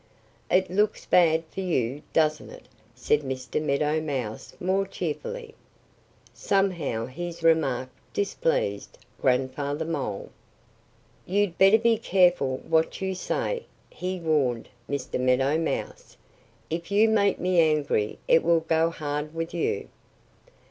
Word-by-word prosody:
"It 185 0 +2
looks 205 +3 +1
bad 165 -2 +4
for - - -7
you, 145 -7 -1
doesn't 155 -1 +1
it?" - - -13 0.3
said 145 +4 +1
Mr. 130 +1 -3
Meadow 150 +1 +1
Mouse 130 -8 -4
more 190 +2 0
cheerfully. 450 - -5 0.8
Somehow 170 - 0
his 170 +6 -7
remark 145 -6 +2 0.2
displeased - - -1 0.2
Grandfather 135 +4 0
Mole. 135 -11 -4 1.0
"You'd 200 -1 +1
better 195 +3 +7
be 230 -1 +2
careful 175 - +2
what 160 0 +1
you 190 0 -2
say!" 475 - -2 0.2
he 185 0 -4
warned 145 -8 0 0.2
Mr. 140 -2 -3
Meadow 135 +4 +2
Mouse. 165 - -4 0.5
"If 170 +1 -3
you 210 +2 +4
make 205 -3 +3
me 180 -1 +2
angry 150 -9 +2
it 165 - +5
will 170 0 +3
go 160 0 +2
hard 150 -1 -4
with 165 0 -4
you." 165 -12 -1
160 Hz, 120 wpm, -26 LUFS, 140-185 Hz, 1.0 s, better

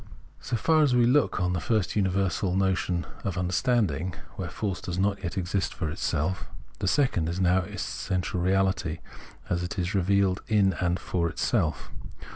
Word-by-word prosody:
So 125 - -3
far 155 +8 +3
as 140 -5 +3
we 120 -1 +5
look 135 0 +3
on 90 -1 +1
the 90 - 0
first 105 -1 0
universal 95 -2 +1
as - - +1
the 95 - +3
notion 95 -2 0 0.2
of 95 -3 -2
understanding, 90 - +1 0.2
where - - -4
force 100 -3 -3
does 90 -1 -4
not 100 +1 +1
yet 90 +1 -4
exist 95 +1 -1
for 80 - -2
itself, 80 +3 -1 0.3
the 95 - -1
second 95 - +2
is 85 +2 -3
now 90 0 +4
its 90 - -4
essential 90 -1 -2
reahty, 95 -3 +1 0.5
as 90 -1 0
it 90 +3 -4
is 90 +1 -1
revealed 100 0 +2
in 100 -3 +3
and 90 0 +1
for 85 -2 -1
itself. - - -1
95 Hz, 180 wpm, -27 LUFS, 90-100 Hz, 0.5 s, we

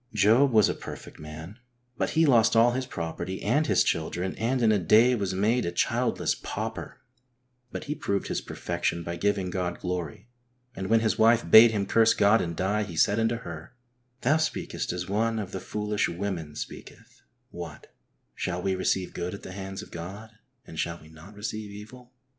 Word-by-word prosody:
Job 110 +7 +5
was 110 -2 +5
a - - 0
perfect - - -10
man, 80 +8 -9 0.4
but - - -1
he 165 - +6
lost 115 -5 +4
all 115 +2 +6
his 130 +1 -3
property 85 +2 -5
and 145 +9 +2
his - - +4
children, 90 +2 -1
and 120 +3 0
in 110 - +5
a 105 - +3
day 110 +8 +5
was 100 -5 -1
made 110 +6 +2
a 85 - -2
childless 85 - 0
pauper, - - -6 0.7
but - - -5
he 145 - -3
proved 100 -9 -2
his - - -2
perfection 85 0 -3
by 85 +1 -4
giving 100 -1 0
God 90 -1 -3
glory, 90 +2 -4 0.5
and 95 - -4
when 115 +2 +4
his 110 -1 0
wife 115 +1 +4
bade 115 +2 +10
him 105 -3 -1
curse 115 +2 +4
God 105 +2 +4
and 85 -1 -3
die, 100 +5 0
he 100 -5 -5
said 105 +6 +3
unto 115 +1 +1
her, 85 +5 -8 0.5
"Thou 145 +5 +3
speakest 155 -1 -2
as 90 0 -4
one 110 +3 0
of 100 -3 -4
the - - -4
foolish 105 0 -1
women 85 -4 -4
speaketh; - - -9 0.3
what, 85 -4 -9 0.4
shall 90 -1 -3
we 95 +1 0
receive 95 0 -1
good 90 +2 -4
at - - -12
the - - -8
hands 95 0 -6
of - - -14
God 95 +6 -8 0.3
and 80 - -9
shall 85 0 -2
we 80 - -16
not 80 +6 -14
receive 110 0 -5
evil 110 +5 -12
100 Hz, 190 wpm, -27 LUFS, 90-115 Hz, 0.7 s, bade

